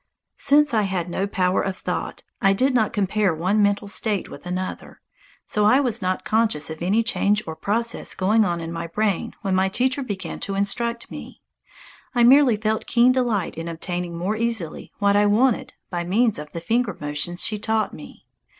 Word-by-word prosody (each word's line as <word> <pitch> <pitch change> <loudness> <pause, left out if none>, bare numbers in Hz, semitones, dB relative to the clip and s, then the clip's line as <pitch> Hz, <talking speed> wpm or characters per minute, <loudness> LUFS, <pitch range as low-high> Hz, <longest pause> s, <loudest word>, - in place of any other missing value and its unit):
Since 290 -1 +4
I 220 - +3
had 180 -2 -2
no 195 +3 -1
power 185 -2 +1
of 190 -1 -3
thought, - - -4 0.2
I 195 -2 +4
did 260 +7 +2
not 220 -4 +2
compare 200 -2 +1
one 185 +6 +1
mental 205 0 +1
state 205 0 -1
with - - -10
another. 185 +1 -5 0.5
So 210 - 0
I 255 +6 +5
was 245 -5 0
not 185 0 -2
conscious 215 -10 +1
of 160 - -8
any 200 +6 +2
change 210 -1 +1
or 160 - -6
process 230 +7 -1
going 215 +4 +3
on 175 -3 -1
in 165 0 -5
my 170 0 -4
brain 210 +4 -1
when 195 -2 0
my 190 +1 +2
teacher 255 +6 0
began 195 -9 -5
to 195 - -4
instruct 235 +4 -1
me. - - -10 0.7
I 240 - +4
merely 255 -2 +6
felt 215 +1 -1
keen 245 +1 +4
delight 235 -10 -1
in 165 - -5
obtaining 175 +1 -4
more 190 +5 -1
easily 220 -8 -2
what 200 0 +2
I 205 0 +4
wanted 230 +4 +2 0.2
by 175 -1 -2
means 210 +2 +1
of 150 0 -8
the 170 - -6
finger 225 +1 0
motions 150 +4 -1
she 215 -2 -1
taught 220 +1 0
me. - - -12
205 Hz, 190 wpm, -23 LUFS, 180-230 Hz, 0.7 s, merely